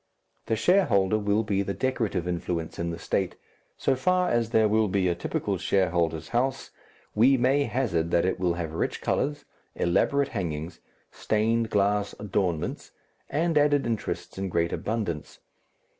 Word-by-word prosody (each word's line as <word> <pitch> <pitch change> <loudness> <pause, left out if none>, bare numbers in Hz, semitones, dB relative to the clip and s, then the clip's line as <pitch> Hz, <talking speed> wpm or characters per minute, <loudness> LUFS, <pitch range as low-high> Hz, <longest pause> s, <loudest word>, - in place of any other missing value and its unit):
The 110 - +1
shareholder 110 - +3
will 105 +1 +1
be 100 -2 0
the 100 0 -3
decorative 115 -9 -1
influence 85 -1 -3
in 85 0 -1
the 85 - -4
State. - - -1 0.4
So 135 - +1
far 180 +7 +1
as 115 -1 +1
there 110 -2 +4
will 110 +1 +2
be 95 -1 +1
a 90 - +2
typical 85 - -2
shareholder's 85 -4 0
house, 130 +2 -1 0.4
we 130 +5 +5
may 135 +3 +2
hazard 95 -13 0
that 85 0 +2
it 95 - -1
will 90 -2 +1
have 85 -2 -4
rich 80 - -2
colours, 145 +1 -1 0.3
elaborate 140 +11 +1
hangings, 80 -2 -4 0.3
stained 110 +1 0
glass 100 0 +1
adornments, 95 -5 -2 0.4
and 160 +1 +2
added 145 -2 +3
interests 115 -4 -3
in 95 0 -2
great 85 -1 0
abundance. 100 -9 -3
105 Hz, 150 wpm, -27 LUFS, 85-125 Hz, 0.4 s, we